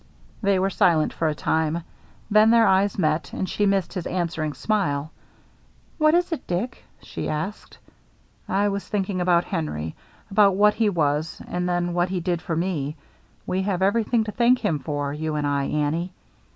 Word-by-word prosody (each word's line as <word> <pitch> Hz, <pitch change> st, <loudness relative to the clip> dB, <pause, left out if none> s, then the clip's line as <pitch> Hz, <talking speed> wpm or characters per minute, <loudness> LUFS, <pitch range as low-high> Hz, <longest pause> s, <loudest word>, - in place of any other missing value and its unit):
They 200 Hz, -2 st, +2 dB
were 190 Hz, +1 st, +1 dB
silent 160 Hz, -4 st, +3 dB
for 165 Hz, -, -1 dB
a 155 Hz, -, 0 dB
time. 160 Hz, +2 st, 0 dB, 0.5 s
Then 215 Hz, +1 st, +6 dB
their 230 Hz, 0 st, +6 dB
eyes 195 Hz, 0 st, +3 dB
met, 155 Hz, -3 st, 0 dB
and 190 Hz, -, -2 dB
she 205 Hz, +2 st, 0 dB
missed 195 Hz, -3 st, 0 dB
his 180 Hz, -3 st, -4 dB
answering 170 Hz, -4 st, -2 dB
smile. 155 Hz, -9 st, -1 dB, 0.4 s
" -, -, -34 dB
What 310 Hz, +1 st, +5 dB
is 355 Hz, 0 st, +1 dB
it, 325 Hz, -, -4 dB
Dick? 180 Hz, +8 st, -3 dB
" -, -, -35 dB
she -, -, -5 dB
asked. 160 Hz, +7 st, -5 dB, 0.7 s
"I 200 Hz, +2 st, +2 dB
was 200 Hz, 0 st, -4 dB
thinking 195 Hz, -3 st, -1 dB
about 175 Hz, -1 st, +3 dB
Henry 115 Hz, -, -3 dB, 0.2 s
— -, -, -30 dB
about 200 Hz, -1 st, +5 dB
what 210 Hz, +1 st, +5 dB
he 220 Hz, -2 st, +2 dB
was, 155 Hz, -3 st, 0 dB
and 180 Hz, 0 st, -2 dB
then 175 Hz, 0 st, 0 dB
what 175 Hz, +1 st, +1 dB
he 185 Hz, -1 st, -1 dB
did 175 Hz, -1 st, -1 dB
for 165 Hz, -, -3 dB
me. 160 Hz, -4 st, -2 dB, 0.5 s
We 185 Hz, +1 st, -1 dB
have 190 Hz, -1 st, -1 dB
everything 225 Hz, +3 st, +2 dB
to 215 Hz, -, -5 dB
thank 240 Hz, +3 st, +4 dB
him 155 Hz, -3 st, +1 dB
for, 145 Hz, -1 st, -3 dB
you 155 Hz, +1 st, -3 dB
and 150 Hz, -1 st, -1 dB
I, 140 Hz, -1 st, 0 dB
Annie." 155 Hz, +5 st, -1 dB
180 Hz, 190 wpm, -24 LUFS, 155-200 Hz, 0.7 s, Then